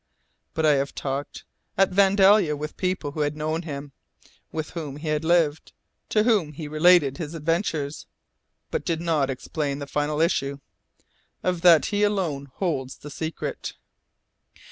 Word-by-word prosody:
But 160 - +1
I 150 - +6
have 140 +1 -2
talked, 140 +1 -4 0.3
at 195 0 +4
Vandalia 195 -3 +5
with 150 +1 -6
people 185 -6 -2
who 155 - -7
had 150 0 0
known 155 +2 -1
him, 145 -3 -7 0.6
with 155 -1 -4
whom 155 -5 -5
he 155 0 -1
lived, 160 -2 +1 0.4
to 215 - +3
whom 205 -10 +2
he 150 +1 -6
related 155 -1 +4
his 160 -1 -5
adventures, 160 -2 -2 0.6
but - - -1
did 165 -2 -1
not 160 -5 +1
explain 140 +2 -3
the 140 - -5
final 150 +1 -1
issue. 140 -4 +1 0.9
Of 180 -2 0
that 170 -3 +7
he 205 - +1
alone 175 -10 0
holds 140 -9 -2
the 145 - -10
secret." 160 +1 -4
155 Hz, 145 wpm, -25 LUFS, 145-175 Hz, 0.9 s, that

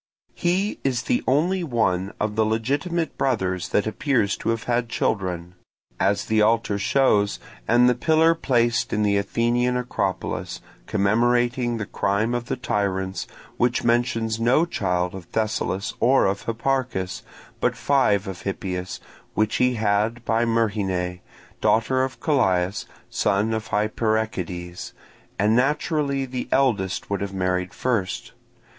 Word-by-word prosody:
He 185 +4 0
is 130 -2 0
the 250 - 0
only 175 +8 +2
one 105 - 0
of 105 0 -1
the 110 - +3
legitimate 140 +10 -1
brothers 95 -9 0
that 105 - +1
appears 110 -2 +1
to - - -3
have 115 -1 -1
had 120 -1 0
children; 90 -6 -2 0.5
as 100 +1 +1
the 110 -1 +2
altar 110 -2 +2
shows, 110 -3 +2 0.3
and 120 +2 +5
the 125 - +5
pillar 160 +6 +3
placed 120 -7 +1
in 105 - +1
the 100 -1 +2
Athenian 120 +4 +1
Acropolis, 125 0 -3 0.3
commemorating 120 +3 +2
the 110 - -3
crime 100 +4 0
of 120 -1 -2
the - - -2
tyrants, 95 -6 -2 0.3
which 120 0 +1
mentions 115 -2 +1
no 125 +8 +3
child 90 - -1
of 95 -2 -8
Thessalus 110 -1 -1
or 130 +2 +4
of 100 +1 -1
Hipparchus, 115 -5 -1 0.4
but - - +1
five 110 -8 +2
of 95 -1 -6
Hippias, 90 -2 -4 0.4
which 110 0 +1
he 125 0 +2
had 110 +2 0
by 115 +1 +2
Myrrhine, 100 -6 0 0.4
daughter 130 +4 +2
of 130 0 -4
Callias, 100 - +1 0.2
son 100 +3 +1
of 110 0 -3
Hyperechides; 105 -5 -2 0.4
and 105 +3 +3
naturally 140 +1 +1
the 125 -1 -5
eldest 100 -9 +1
would 100 - -1
have 100 -1 -4
married 90 -1 -1
first. 120 -1 -2
115 Hz, 135 wpm, -24 LUFS, 100-125 Hz, 0.5 s, and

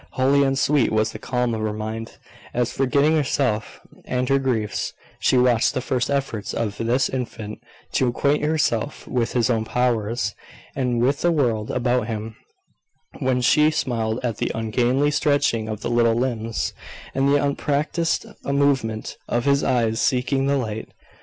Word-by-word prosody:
Holy 135 +2 +3
and 135 -1 +2
sweet 145 -1 +2
was 110 0 +1
the - - -8
calm 125 -2 -1
of 110 - -2
her 110 0 -1
mind, 110 +1 -5 0.4
as, 120 -1 +1
forgetting 140 +3 +2
herself 125 -7 -1 0.2
and 125 0 -1
her 135 0 +4
griefs, 110 -7 -1 0.3
she 130 - +3
watched 125 -2 +3
the - - +1
first 125 0 -1
efforts 135 -7 -2
of 105 -3 -2
this 120 +4 +2
infant 110 -4 -5 0.3
to 130 - +2
acquaint 140 +4 +1
himself 150 -5 0
with 120 -3 -1
his 120 -1 +2
own 115 -3 +1
powers, 115 -2 0 0.4
and 125 -3 0
with 140 +3 +1
the 175 - +3
world 120 -9 0
about 125 -2 0
him; 110 -1 -5 0.8
when 130 -1 +1
she 150 +5 +5
smiled 115 -6 -1
at 115 -4 -2
the - - -1
ungainly 120 +6 +1
stretching 140 -7 +1
of 110 -1 -5
the - - -2
little 115 -1 +3
limbs, 115 -2 -1 0.4
and 135 +1 +2
the 140 - +4
unpractised 145 +3 0 0.2
movement 140 -6 0
of 120 +1 -1
his 140 0 +3
eyes 115 -2 +1
seeking 135 +2 +1
the 140 0 +2
light. 110 -4 -4
125 Hz, 160 wpm, -23 LUFS, 115-135 Hz, 0.8 s, she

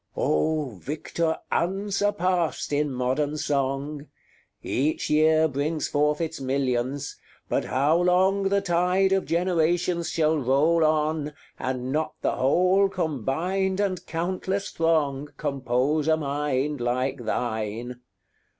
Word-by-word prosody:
Oh, 150 - +1
victor 160 - -2
unsurpassed 185 -3 0
in 145 0 +1
modern 135 +4 -1
song! 140 0 -2 0.6
Each 150 +4 -1
year 155 +1 +4
brings 150 +2 -2
forth 150 +1 +1
its 160 -2 -3
millions; 130 +1 -1 0.3
but - - 0
how 145 +5 +2
long 190 +2 +3
The 200 0 +2
tide 180 +1 +2
of 195 0 +1
generations 175 0 +1
shall 155 -1 +1
roll 145 +6 +3
on, 155 -1 +1 0.3
And 130 0 -3
not 155 +2 -1
the - - +2
whole 185 +8 +3
combined 180 - -1
and 195 -3 -1
countless 185 +4 -2
throng 150 -4 0
Compose 140 +1 0
a 160 0 +4
mind 145 -1 -1
like 125 +1 -1
thine? 115 +1 -3
155 Hz, 115 wpm, -25 LUFS, 135-175 Hz, 0.6 s, year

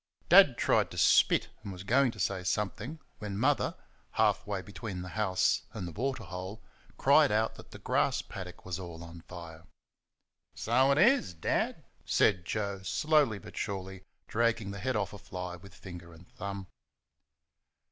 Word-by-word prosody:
Dad - - +8
tried - - +2
to - - -10
spit, - - +4
and 105 -2 -7
was 90 -1 -8
going 130 +6 +3
to 110 - -8
say 95 0 -1
something 105 - -2 0.2
when 100 -2 -4
Mother, 135 +6 +2 0.4
half - - +2
way 100 -2 -2
between 100 -3 -6
the 90 - -7
house 95 -3 +1
and 100 -6 -5
the - - -6
waterhole, 100 -3 -4 0.4
cried - - +5
out 110 +1 +1
that - - -13
the - - -10
grass - - +1
paddock 90 -2 -9
was 90 0 -3
all 85 -2 -8
on 85 0 -10
fire. 85 -2 -10 0.9
"So 130 +4 +3
it 140 - +3
is, 235 - +4
Dad!" 80 - -1 0.2
said 90 -4 +2
Joe, 100 -1 -2
slowly 145 - +2
but 105 +1 -12
surely 95 -2 -4 0.3
dragging 115 -3 +1
the 100 - -6
head 130 +3 -1
off 105 -2 -1
a 100 - -9
fly 90 -1 -6
with 95 +2 -15
finger 85 -3 -10
and 80 +2 -16
thumb. 100 0 -6
100 Hz, 165 wpm, -31 LUFS, 90-110 Hz, 0.9 s, Dad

